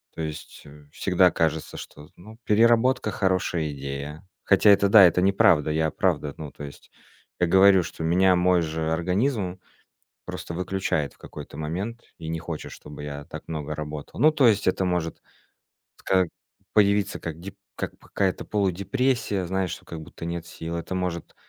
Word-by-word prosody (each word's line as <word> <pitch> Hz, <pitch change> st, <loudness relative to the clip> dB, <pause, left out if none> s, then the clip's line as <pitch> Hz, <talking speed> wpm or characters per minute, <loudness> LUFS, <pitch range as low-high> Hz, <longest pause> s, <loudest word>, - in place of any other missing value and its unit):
То -, -, -5 dB
есть, 75 Hz, -1 st, -7 dB
э, 75 Hz, 0 st, -15 dB
всегда 90 Hz, 0 st, +3 dB
кажется, 80 Hz, -1 st, -1 dB
что, 75 Hz, +1 st, -11 dB
ну 110 Hz, +5 st, -14 dB
переработка- 115 Hz, +1 st, +3 dB
хорошая 90 Hz, -5 st, 0 dB
идея. 70 Hz, +4 st, -7 dB, 0.2 s
Хотя -, -, +5 dB
это, 100 Hz, 0 st, +6 dB
да, 100 Hz, -1 st, +9 dB
это 90 Hz, +1 st, +3 dB
неправда. 95 Hz, -6 st, +4 dB
Я, 80 Hz, 0 st, +1 dB
правда, 75 Hz, -6 st, 0 dB
ну 75 Hz, -3 st, -7 dB
то -, -, -10 dB
есть 70 Hz, 0 st, -11 dB, 0.5 s
я 90 Hz, -, +3 dB
говорю, 95 Hz, +1 st, +6 dB
что 80 Hz, -, -7 dB
меня 90 Hz, +3 st, +4 dB
мой 90 Hz, 0 st, +3 dB
же 80 Hz, 0 st, -2 dB
организм 95 Hz, +3 st, 0 dB, 0.7 s
просто 85 Hz, -, -6 dB
выключает 90 Hz, -6 st, -2 dB
в -, -, -27 dB
какой-то -, -, -10 dB
момент 95 Hz, +10 st, -4 dB
и 80 Hz, -, -8 dB
не 80 Hz, -, -2 dB
хочет, 85 Hz, -2 st, -6 dB
чтобы 75 Hz, 0 st, -10 dB
я 70 Hz, 0 st, -6 dB
так -, -, -9 dB
много 75 Hz, -1 st, -4 dB
работал. 75 Hz, +2 st, -7 dB
Ну 155 Hz, +5 st, +6 dB
то 140 Hz, -5 st, +4 dB
есть 100 Hz, -4 st, +2 dB
это 95 Hz, 0 st, +1 dB
может 90 Hz, -2 st, -2 dB, 0.8 s
ска 95 Hz, -1 st, +2 dB, 0.5 s
появиться 100 Hz, -1 st, +3 dB
как 80 Hz, -1 st, -6 dB
дип 100 Hz, +3 st, -9 dB, 0.2 s
как -, -, -4 dB
п -, -, -21 dB
какая-то 95 Hz, -2 st, -1 dB
полудепрессия, 100 Hz, +2 st, 0 dB
знаешь, 95 Hz, 0 st, -1 dB
что 90 Hz, -, -8 dB
как 80 Hz, -2 st, -7 dB
будто 85 Hz, -, -9 dB
нет 85 Hz, 0 st, -4 dB
сил. 85 Hz, -1 st, -6 dB
Это 85 Hz, +2 st, -4 dB
может 90 Hz, -2 st, -4 dB
90 Hz, 170 wpm, -25 LUFS, 80-100 Hz, 0.8 s, да